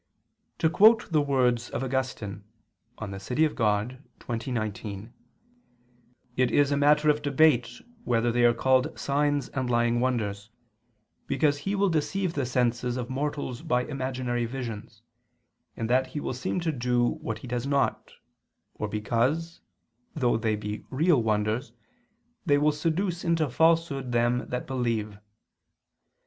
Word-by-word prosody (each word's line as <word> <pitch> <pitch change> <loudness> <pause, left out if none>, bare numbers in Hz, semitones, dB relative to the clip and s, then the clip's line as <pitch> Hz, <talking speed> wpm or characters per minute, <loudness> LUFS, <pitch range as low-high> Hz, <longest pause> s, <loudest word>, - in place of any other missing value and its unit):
To - - +2
quote 215 +5 +5
the 155 -2 +3
words 125 -4 +1
of - - -3
Augustine 130 -6 -3 0.5
(De 100 -2 -6
Civ. 110 +7 -5
Dei 155 0 +4
xx, 115 +1 -3
19), 110 -1 -4 1.2
"it 130 -1 +2
is 145 -1 +3
a - - +2
matter 150 +1 +4
of 150 0 -3
debate 145 -4 +3 0.3
whether 120 - +1
they 120 +1 +2
are 120 0 +6
called 130 +1 +2
signs 145 0 0
and 130 -2 -3
lying 120 0 +2
wonders, 110 -5 -1 0.8
because 145 +1 +1
he 195 +7 -2
will 200 0 +2
deceive 170 +3 -1
the 140 -6 -1
senses 125 0 0
of 125 0 -4
mortals 140 -2 -3
by 125 0 0
imaginary 130 -3 -2
visions, 115 -3 -7 0.7
in 115 - -3
that 130 +3 +2
he 140 +3 -5
will - - -3
seem 125 +8 -2
to 165 -1 0
do 125 -3 +1 0.2
what 110 - -3
he 120 - -10
does 125 +2 -3
not, 140 -1 0 0.6
or 105 - -4
because, 120 +11 -1 0.5
though 125 -6 +2
they 110 -1 0
be 105 0 -5
real 150 0 +3
wonders, 110 +3 -1 0.7
they 145 -6 +3
will 150 +1 +3
seduce 170 +4 -1
into 165 -2 +1
falsehood 160 -2 +1
them 120 0 +1
that 125 0 -3
believe." 115 -5 -2
125 Hz, 140 wpm, -27 LUFS, 115-145 Hz, 1.2 s, are